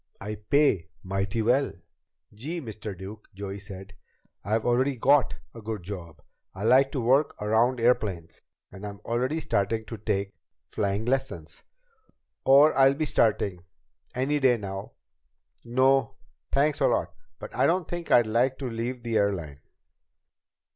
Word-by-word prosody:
I 105 Hz, +1 st, -5 dB
pay 105 Hz, -, +2 dB, 0.2 s
mighty 95 Hz, +4 st, -1 dB
well." 130 Hz, +5 st, +2 dB, 0.6 s
"Gee, 150 Hz, +12 st, -5 dB
Mr. 110 Hz, -, -7 dB
Duke," 100 Hz, +4 st, -10 dB
Joey 100 Hz, 0 st, -6 dB
said, 100 Hz, 0 st, -10 dB, 0.5 s
"I've 110 Hz, +2 st, 0 dB
already 130 Hz, +3 st, +2 dB
got 135 Hz, +3 st, +3 dB, 0.2 s
a 115 Hz, -, -10 dB
good 105 Hz, -3 st, -5 dB
job. 85 Hz, -5 st, -8 dB, 0.3 s
I 95 Hz, -, -6 dB
like 130 Hz, +4 st, +5 dB
to 140 Hz, -, -1 dB
work 130 Hz, +5 st, +2 dB
around 115 Hz, +4 st, +2 dB
airplanes, 105 Hz, -8 st, 0 dB, 0.3 s
and 95 Hz, +1 st, -11 dB
I'm 100 Hz, -1 st, -6 dB
already 130 Hz, +7 st, 0 dB
starting 110 Hz, -5 st, -1 dB
to 115 Hz, -, -7 dB
take 100 Hz, -2 st, -2 dB, 0.3 s
flying 100 Hz, +2 st, -1 dB
lessons. 125 Hz, -11 st, -2 dB, 0.8 s
Or 140 Hz, +3 st, +7 dB
I'll 135 Hz, 0 st, +5 dB
be 155 Hz, +2 st, -1 dB
starting 100 Hz, -, +1 dB, 0.5 s
any 140 Hz, +4 st, +1 dB
day 130 Hz, -3 st, +4 dB
now. 95 Hz, -2 st, -6 dB, 0.7 s
No 130 Hz, +3 st, +2 dB, 0.4 s
thanks 145 Hz, +1 st, +2 dB
a -, -, +4 dB
lot -, -, 0 dB, 0.2 s
but -, -, -9 dB
I -, -, +3 dB
don't 175 Hz, 0 st, +1 dB
think 175 Hz, -1 st, -5 dB
I'd 120 Hz, -, +6 dB
like 120 Hz, +4 st, +1 dB
to 135 Hz, -, -5 dB
leave 120 Hz, +1 st, -4 dB
the 115 Hz, -2 st, 0 dB
airline." 85 Hz, -8 st, -1 dB
115 Hz, 145 wpm, -27 LUFS, 100-135 Hz, 0.8 s, Or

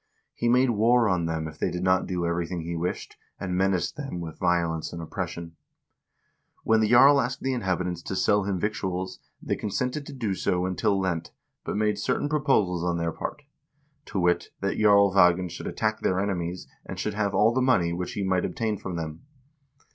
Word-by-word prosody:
He 120 Hz, -, 0 dB
made 125 Hz, +1 st, +4 dB
war 115 Hz, +2 st, +4 dB
on 90 Hz, -4 st, +1 dB
them 80 Hz, -1 st, -2 dB
if 80 Hz, -, -11 dB
they -, -, +1 dB
did 90 Hz, +1 st, -4 dB
not 95 Hz, 0 st, +2 dB
do 90 Hz, -2 st, -2 dB
everything 85 Hz, +1 st, -2 dB
he 85 Hz, +1 st, -4 dB
wished, 85 Hz, +2 st, -4 dB, 0.2 s
and 90 Hz, -2 st, -3 dB
menaced 90 Hz, -2 st, 0 dB
them 135 Hz, -12 st, -5 dB
with 80 Hz, -2 st, -7 dB
violence 85 Hz, -3 st, 0 dB
and 85 Hz, -, -6 dB
oppression. 85 Hz, -1 st, -5 dB, 1.1 s
When 110 Hz, 0 st, +3 dB
the 110 Hz, -1 st, +2 dB
jarl 140 Hz, +4 st, +7 dB
asked 125 Hz, +1 st, -3 dB
the 135 Hz, 0 st, 0 dB
inhabitants 90 Hz, -6 st, -2 dB
to 95 Hz, -, -5 dB
sell 105 Hz, +1 st, +2 dB
him 95 Hz, -2 st, -1 dB
victuals, 95 Hz, -2 st, -3 dB, 0.2 s
they -, -, -1 dB
consented 125 Hz, +7 st, -3 dB
to 145 Hz, -, -8 dB
do 115 Hz, -7 st, -2 dB
so 90 Hz, -1 st, 0 dB
until 100 Hz, +2 st, +1 dB
Lent, 90 Hz, -4 st, -2 dB, 0.3 s
but -, -, -3 dB
made 105 Hz, 0 st, +1 dB
cer 125 Hz, -, 0 dB
tain 145 Hz, -, -2 dB
proposals 120 Hz, -, +1 dB
on 85 Hz, -1 st, 0 dB
their 85 Hz, 0 st, -1 dB
part 150 Hz, -, -6 dB, 0.3 s
— 145 Hz, 0 st, -43 dB
to 100 Hz, -, -2 dB
wit, 90 Hz, -1 st, +1 dB
that 100 Hz, 0 st, -2 dB
Jarl 100 Hz, -2 st, +5 dB
Ragnvald 90 Hz, -2 st, +4 dB
should 85 Hz, -, -6 dB
attack 110 Hz, 0 st, -1 dB
their 95 Hz, -, +1 dB
enemies, 90 Hz, -3 st, -2 dB, 0.2 s
and -, -, -7 dB
should 105 Hz, -, -2 dB
have 100 Hz, -1 st, -1 dB
all 110 Hz, +2 st, +4 dB
the 130 Hz, -, +1 dB
money 95 Hz, -10 st, +3 dB
which 90 Hz, +1 st, -4 dB
he 100 Hz, -, -2 dB
might 95 Hz, -1 st, +1 dB
obtain 110 Hz, -2 st, -2 dB
from 95 Hz, -3 st, -5 dB
them. 80 Hz, -1 st, -5 dB
95 Hz, 200 wpm, -26 LUFS, 85-110 Hz, 1.1 s, jarl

